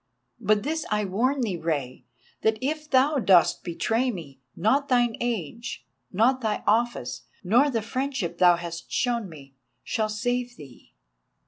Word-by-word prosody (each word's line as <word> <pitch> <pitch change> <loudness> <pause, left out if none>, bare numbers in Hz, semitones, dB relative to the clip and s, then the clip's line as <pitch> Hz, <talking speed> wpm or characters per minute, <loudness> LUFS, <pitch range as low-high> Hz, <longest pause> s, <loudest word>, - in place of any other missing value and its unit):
But 210 -1 +2
this 315 +3 -2
I 210 -1 0
warn 250 +9 0
thee, 205 -7 -1
Rei, 145 -6 -3 0.4
that 220 0 +2
if 300 +4 -3
thou 275 +2 +3
dost 185 -6 +4
betray 225 +8 0
me, 155 - -7 0.2
not 270 +10 +2
thine 240 -2 +3
age, 230 - -4 0.3
not 250 +7 +2
thy 215 -3 -1
office, 225 - 0 0.2
nor 245 +10 +4
the 230 -5 -1
friendship 255 -5 -3
thou 180 -1 +7
hast 170 -1 -7
shown 235 -5 0
me, 140 -4 -13 0.3
shall 220 -2 -1
save 245 +3 -2
thee." 130 - -15
220 Hz, 145 wpm, -26 LUFS, 175-250 Hz, 0.4 s, thou